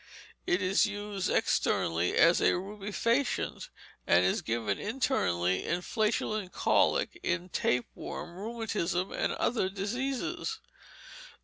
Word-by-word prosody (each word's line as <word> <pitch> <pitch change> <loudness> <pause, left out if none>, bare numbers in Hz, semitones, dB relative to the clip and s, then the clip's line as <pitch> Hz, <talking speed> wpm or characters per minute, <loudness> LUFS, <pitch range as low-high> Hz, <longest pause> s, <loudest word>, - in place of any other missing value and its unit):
It 180 +3 +2
is 195 +4 +3
used 205 -2 -3
externally 85 +1 +1
as 170 +1 +5
a - - +4
rubefacient, 210 +7 -1 0.4
and 90 +1 +5
is 90 - +1
given 110 -3 -1
internally 95 - 0
in 175 +1 -1
flatulent 215 -3 -1
colic, 350 - +2
in 185 - -1
tapeworm, 125 +5 -2
rheumatism, 205 -4 -2
and - - -1
other 220 -6 0
diseases. 250 - -3
195 Hz, 105 wpm, -30 LUFS, 170-220 Hz, 0.4 s, as